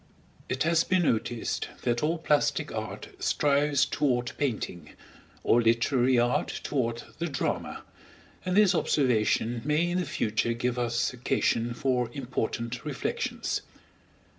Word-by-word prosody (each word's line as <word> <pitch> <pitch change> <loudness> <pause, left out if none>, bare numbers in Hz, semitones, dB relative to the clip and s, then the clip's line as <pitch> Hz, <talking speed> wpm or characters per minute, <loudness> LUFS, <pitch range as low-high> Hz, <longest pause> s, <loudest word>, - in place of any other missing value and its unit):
It 130 +1 0
has 165 0 +3
been 185 -1 +2
noticed 115 -4 -1 0.2
that 120 0 +1
all 160 +3 +1
plastic 150 -2 +1
art - - -5
strives 145 -1 +2
toward 125 -4 0
painting, 105 - -3 0.5
all 120 - +4
literary 120 +2 +3
art 120 +1 +1
toward 120 -4 -1 0.2
the 170 - -1
drama, 140 -4 -3 0.6
and 185 +1 0
this 210 -3 +6
observation 120 -3 +1
may 150 +4 +2
in 175 +1 0
the 180 - -1
future 115 -3 0
give 125 +1 -1
us 120 0 0
occasion 120 -1 0
for 125 -3 0
important 120 -2 -3
reflections. 145 -5 -2
125 Hz, 125 wpm, -28 LUFS, 120-150 Hz, 0.6 s, this